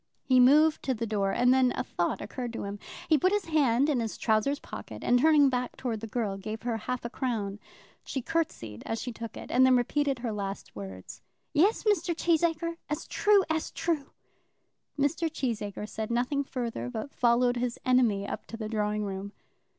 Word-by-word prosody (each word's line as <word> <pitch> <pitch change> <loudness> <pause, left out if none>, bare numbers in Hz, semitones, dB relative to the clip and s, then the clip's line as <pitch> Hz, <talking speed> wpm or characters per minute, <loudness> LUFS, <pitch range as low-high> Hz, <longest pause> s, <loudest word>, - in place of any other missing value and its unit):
He 255 -1 +4
moved 300 +5 +6
to 260 -3 -1
the 230 +1 -2
door, 200 -3 0
and 250 +4 +4
then 260 -1 +4
a - - -1
thought 175 - -2
occurred 240 +3 -5
to - - -4
him. 200 0 -5 0.3
He 315 -3 +4
put 370 +7 +3
his 415 -2 0
hand 280 -6 +3
to 300 - +2
his 230 -4 -2
trousers 220 +6 +1
pocket, - - -9
and 245 0 +4
turning 300 0 +6
back 250 -1 -2
towards 230 -4 -3
the 225 - -5
girl, 210 -3 -2
gave 215 +3 -6
her 240 -1 -1
half 245 +3 -4
a - - -2
crown. 215 -7 -2 0.4
She 270 - -3
curtsied 115 - -2
as 225 - -2
she 250 - -4
took 230 0 -7
it, - - -8
and 255 - +5
then 260 0 +6
repeated 275 +2 0
her 235 -1 -3
last 200 -1 -5
words. 95 -2 -8 0.3
"Yes, 385 +9 +3
Mr. 355 -5 +1
Cheesacre, 335 0 +1
as 300 - -3
true 415 -2 +4
as 320 -1 -1
true." 310 -5 -2 0.9
Mr. 310 +3 +1
Cheesacre 215 -7 -3
said 215 0 -5
nothing 250 +4 0
further, 235 - -4
but 220 - -6
followed 245 0 +3
his 240 -1 -2
enemy 235 -6 +3
up - - -6
to 225 - -7
the 220 -1 -4
drawing 210 -1 -1
room. 195 +1 -5
245 Hz, 195 wpm, -29 LUFS, 215-290 Hz, 0.9 s, moved